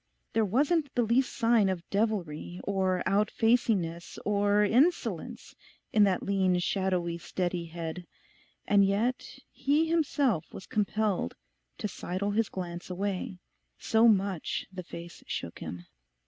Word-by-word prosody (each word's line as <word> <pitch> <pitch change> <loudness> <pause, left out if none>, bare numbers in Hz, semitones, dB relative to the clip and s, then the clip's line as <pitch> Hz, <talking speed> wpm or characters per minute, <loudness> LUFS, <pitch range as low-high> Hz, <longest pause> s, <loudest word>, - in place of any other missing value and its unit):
There 225 - +3
wasn't 285 - +1
the 245 - +3
least 240 +3 +2
sign 230 -4 +3
of 180 -3 -3
devilry, 185 -5 -1
or 190 -2 0
out 205 +2 +2
facingness, 200 -8 +1
or 205 0 +3
insolence 275 - +1 0.4
in 210 -2 +6
that 190 -2 +1
lean 190 -2 +2
shadowy 180 -2 0
steady 175 -1 -2
head; 170 +1 -6 0.6
and 205 -1 +5
yet 215 +6 0
he 295 +4 +2
himself 285 - +1
was 190 - -9
compelled 210 -1 0 0.4
to 210 - -2
sidle 200 +1 -3
his 220 +1 +1
glance 175 -1 -6
away, 190 0 -3 0.4
so 225 +1 +4
much 195 -5 +1
the 185 - -5
face 170 -1 -10
shook - - -5
him. 90 0 -7
200 Hz, 130 wpm, -29 LUFS, 180-225 Hz, 0.6 s, in